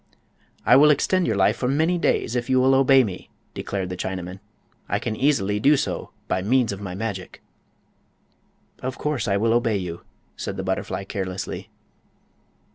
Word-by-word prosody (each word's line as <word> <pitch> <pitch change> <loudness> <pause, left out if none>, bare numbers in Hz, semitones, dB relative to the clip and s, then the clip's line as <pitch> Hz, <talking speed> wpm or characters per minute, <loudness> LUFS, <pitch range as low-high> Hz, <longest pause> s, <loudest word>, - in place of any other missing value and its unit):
"I 125 - +7
will 150 +2 +7
extend 175 +5 +2
your 110 - +1
life 100 +2 +3
for 125 - -1
many 160 +6 +1
days, 120 - 0
if 120 +1 -2
you 130 0 +4
will 130 +1 +4
obey 135 0 +6
me," 95 -5 -6 0.2
declared 95 -2 -4
the 90 - -4
Chinaman. 90 0 -5 0.5
"I - - +1
can 110 - -3
easily 105 -7 +1
do 145 +6 +5
so - - -3 0.2
by 95 - 0
means 120 +3 +2
of 100 0 -6
my 95 -3 -5
magic." 100 -3 -5 1.4
"Of 130 0 -4
course 145 -6 -2
I 100 -1 +2
will 115 +2 +2
obey 115 -3 +2
you," 90 -3 -5 0.3
said - - -5
the - - -3
butterfly, - - -2
carelessly. 95 -1 -5
110 Hz, 170 wpm, -23 LUFS, 95-130 Hz, 1.4 s, I